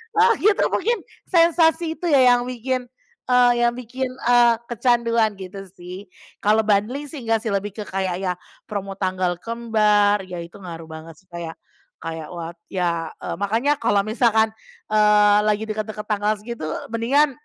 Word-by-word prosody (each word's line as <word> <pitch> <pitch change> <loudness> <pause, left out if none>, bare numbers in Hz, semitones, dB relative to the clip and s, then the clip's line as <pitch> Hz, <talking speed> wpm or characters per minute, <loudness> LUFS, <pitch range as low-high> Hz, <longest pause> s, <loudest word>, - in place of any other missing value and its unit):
nah 455 +2 +5
gitu, 415 +1 +3
mungkin, 470 +1 +1 0.3
sensasi 330 -1 +3
itu 350 - -2
ya, 275 - +6 0.2
yang 245 - 0
bikin, 255 0 -3 0.4
eee, 250 -1 +5 0.2
yang - - +2
bikin, 250 +2 -4
eee, 240 -2 +3
kecanduan, 235 -3 +1
gitu 195 +1 -8
sih. 180 +2 -10 0.4
Kalau 215 +2 +4
bundling 230 +8 +1
sih, 300 - -7
ngga 225 -1 +2
sih, 220 - -2
lebih 200 +1 -2
ke 210 - -5
kayak, 190 -2 -2
ya, 180 -1 0 0.3
promo 200 -2 -5
tanggal 185 -2 0
kembar, 210 -3 +2
ya, 180 -2 -6
itu 170 - -13
ngaruh 165 -3 -9
banget 160 0 -11
sih, 190 - -28
kayak 170 -2 -7 0.5
kayak 160 -1 -5
wah 170 0 -5 0.2
ya, 170 -3 -2
eee, - - -3
makanya 230 +9 +1
kalau 205 -3 +2
misalkan, 220 -1 +2 0.4
eee, 210 -1 +5
lagi 210 +1 +1
deket-deket 215 0 -4
tanggal 210 0 +1
segitu, 235 -4 -7 0.3
mendingan 275 +6 +2
215 Hz, 160 wpm, -22 LUFS, 190-245 Hz, 0.5 s, ya